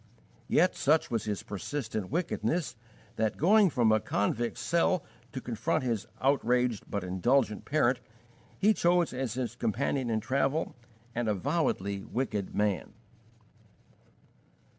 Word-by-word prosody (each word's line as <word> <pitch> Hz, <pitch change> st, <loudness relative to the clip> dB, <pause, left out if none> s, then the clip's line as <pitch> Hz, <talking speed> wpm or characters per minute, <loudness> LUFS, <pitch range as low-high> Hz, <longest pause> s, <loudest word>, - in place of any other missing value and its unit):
Yet 180 Hz, +3 st, +3 dB
such 155 Hz, +3 st, +2 dB
was 115 Hz, -2 st, -1 dB
his 105 Hz, -2 st, -3 dB
persistent 110 Hz, -1 st, -4 dB
wickedness 170 Hz, -1 st, -1 dB, 0.4 s
that, 110 Hz, -1 st, 0 dB
going 200 Hz, +4 st, +5 dB
from 120 Hz, -7 st, +3 dB
a 110 Hz, -, +4 dB
convict's 110 Hz, +4 st, -1 dB
cell 170 Hz, 0 st, +1 dB, 0.3 s
to 130 Hz, -, -4 dB
confront 120 Hz, -1 st, -1 dB
his 115 Hz, -5 st, -1 dB
outraged 125 Hz, -4 st, +1 dB
but 100 Hz, -2 st, -2 dB
indulgent 105 Hz, +5 st, +1 dB
parent, 130 Hz, -4 st, +2 dB, 0.6 s
he 210 Hz, +3 st, +4 dB
chose 175 Hz, -4 st, +2 dB
as 130 Hz, -3 st, -3 dB
his 125 Hz, -2 st, -3 dB
companion 125 Hz, +2 st, -1 dB
in 110 Hz, -1 st, +1 dB
travel 135 Hz, +6 st, 0 dB, 0.4 s
an 120 Hz, 0 st, -1 dB
avowedly 100 Hz, -, 0 dB
wicked 105 Hz, -6 st, -3 dB
man. 105 Hz, -6 st, 0 dB
125 Hz, 120 wpm, -30 LUFS, 110-145 Hz, 0.6 s, going